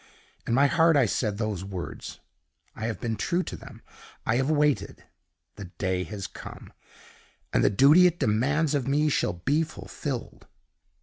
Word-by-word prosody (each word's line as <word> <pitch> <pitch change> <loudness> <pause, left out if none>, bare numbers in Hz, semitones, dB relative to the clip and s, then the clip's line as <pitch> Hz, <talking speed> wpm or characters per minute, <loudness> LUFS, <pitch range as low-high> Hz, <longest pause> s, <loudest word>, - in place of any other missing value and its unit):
In 115 - +1
my 140 +2 +5
heart 165 +2 +4
I 135 - +4
said 105 -1 -1
those 105 -4 -3
words 95 -3 -7 0.5
I 110 - -3
have 115 - -4
been 115 -1 -2
true 175 +10 -1
to - - -6
them - - -13 0.4
I 110 - +1
have 135 +2 0
waited. 150 -2 +1 0.5
The 100 - -7
day 95 -1 -1
has 100 -3 -6
come, - - -10 0.8
and - - +3
the - - +5
duty 145 - +6
it 175 -1 -1
demands 140 +6 +1
of 140 -3 -1
me 150 +2 +2
shall 135 - 0
be 140 - 0
fulfilled." 145 -5 -6
130 Hz, 165 wpm, -26 LUFS, 105-150 Hz, 0.8 s, duty